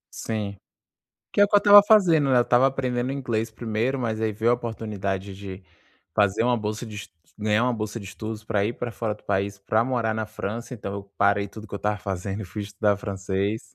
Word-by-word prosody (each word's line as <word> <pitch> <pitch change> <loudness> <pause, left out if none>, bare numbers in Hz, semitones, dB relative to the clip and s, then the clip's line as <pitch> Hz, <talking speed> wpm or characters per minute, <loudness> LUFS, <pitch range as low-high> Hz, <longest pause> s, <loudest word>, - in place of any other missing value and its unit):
Sim. 105 -3 -3 0.8
Que - - +4
é - - +10
o - - +4
que 205 - +2
eu - - +9
estava 205 0 +9
fazendo, 175 -10 +5
né, 125 - +5
eu - - +6
estava 120 +2 +4
aprendendo 130 -1 -1
inglês 115 -5 -2
primeiro, 115 +4 -1
mas 110 -2 -2
aí 110 -1 +1
veio 110 +3 +1
a - - +5
oportunidade 100 -5 -4
de 95 -1 -8 0.5
fazer 105 0 +3
uma 120 0 +3
bolsa 105 +2 -3
de 110 -2 -9
es 105 - -7 0.3
ganhar 105 +1 +2
uma 125 -1 +2
bolsa 110 +1 -4
de 100 - -9
estudos, 110 +2 -6
pra 100 -2 +1
ir 115 - -1
pra 120 0 -4
fora 115 -2 -2
do 105 - -18
país, 100 +1 -1
pra 110 +3 +1
morar 120 -3 0
na 110 0 -2
França. 110 +3 -5
Então 100 -4 -6
eu 100 0 -5
parei 100 0 +3
tudo 110 0 -10
o - - -15
que - - -14
eu - - -2
estava 105 +1 -1
fazendo, 95 +1 -4
e 105 - -6
fui 105 +4 -6
estudar 100 0 +1
francês. 100 +1 -2
110 Hz, 230 wpm, -25 LUFS, 100-120 Hz, 0.8 s, é